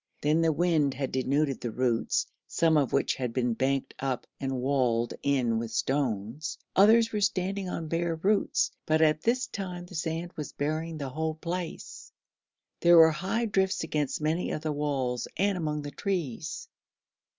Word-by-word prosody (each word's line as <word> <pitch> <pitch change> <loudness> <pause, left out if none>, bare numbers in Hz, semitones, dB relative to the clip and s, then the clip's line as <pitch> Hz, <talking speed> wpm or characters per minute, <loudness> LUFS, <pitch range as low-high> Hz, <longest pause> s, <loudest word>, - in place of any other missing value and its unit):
Then 155 +3 +3
the 165 -1 +3
wind 155 -4 +2
had 135 0 -3
denuded 135 +2 0
the 120 - -2
roots, 120 0 0 0.2
some 165 -1 +2
of 145 -4 +2
which 140 - +2
had 125 -3 -3
been 125 -2 +1
banked 135 +3 -1
up 130 -2 -2
and 135 -1 -2
walled 125 -3 +1
in 125 -5 +1
with 115 0 -4
stones; 125 +3 -2 0.2
others 225 +3 +6
were 210 - -1
standing 195 0 0
on 165 -2 -4
bare 165 +1 -1
roots, 200 +5 +1 0.2
but 155 +1 +4
at 155 0 +3
this 245 +2 +1
time 180 -5 -6
the 180 - -14
sand 165 +1 -3
was 150 - -6
burying 155 +3 -2
the 140 -3 -4
whole 155 +3 -2
place. 170 +2 -6 0.7
There 170 0 +6
were 160 -1 +8
high 190 +9 -1
drifts 190 -3 +1
against 150 -2 -2
many 160 +3 0
of 155 - -3
the 155 -1 -1
walls 135 -5 -1
and 200 +2 +2
among 150 -4 -2
the 145 - -6
trees. 165 - -3
155 Hz, 170 wpm, -28 LUFS, 135-175 Hz, 0.7 s, were